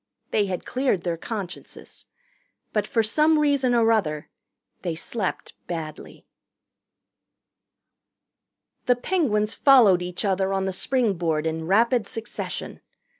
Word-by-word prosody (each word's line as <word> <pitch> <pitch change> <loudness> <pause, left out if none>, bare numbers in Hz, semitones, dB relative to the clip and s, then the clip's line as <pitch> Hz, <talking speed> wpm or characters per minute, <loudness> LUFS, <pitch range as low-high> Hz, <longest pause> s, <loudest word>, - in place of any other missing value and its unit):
They 205 -2 +2
had 180 -2 -4
cleared 255 -9 0
their 175 -2 -1
consciences. 195 0 -8 0.7
But 210 -1 0
for 225 - +1
some 305 +8 +3
reason 280 -4 +2
or 230 -1 +4
other 155 -9 -1 0.5
they 170 -3 -3
slept 190 +4 -4
badly. 160 -3 -7 2.6
The 250 - +5
Penguins 245 - 0
followed 230 -10 +5
each 180 +3 -4
other 190 0 +1
on 195 0 0
the 190 - -2
springboard 180 - 0
in 160 0 -3
rapid 225 +3 +3
succession. 225 -2 -6
210 Hz, 115 wpm, -24 LUFS, 180-245 Hz, 2.6 s, The